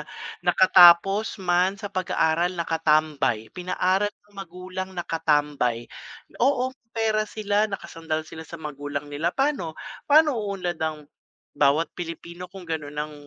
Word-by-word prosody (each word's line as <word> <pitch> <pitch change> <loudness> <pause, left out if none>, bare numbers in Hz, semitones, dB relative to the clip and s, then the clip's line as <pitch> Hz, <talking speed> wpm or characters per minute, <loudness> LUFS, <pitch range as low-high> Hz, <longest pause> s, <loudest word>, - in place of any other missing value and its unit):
na - - -5 0.4
nakatapos 185 +3 +6
man 185 0 +1
sa 205 -1 -7
pag-aaral, 175 -1 0
nakatambay. 155 -8 +1
Pinaaral 185 +2 0
ng 205 0 -23
magulang, 185 0 -7
nakatambay. 150 -8 0 0.6
Oo, 260 0 +2
may 255 -3 -36
pera 215 -1 +1
sila, 210 0 0
nakasandal 160 -5 -4
sila 160 +1 -10
sa 170 - -7
magulang 145 -2 -5
nila. 155 +4 0
Paano, 270 - -1 0.3
paano 305 +1 +6
uunlad 190 -5 -4
ang 155 -1 -3 0.5
bawat 145 +3 +2
Pilipino 170 +1 -7
kung 190 0 -11
gano'n 155 -3 -5
ang 150 +1 -3
175 Hz, 125 wpm, -25 LUFS, 155-200 Hz, 0.6 s, nakatapos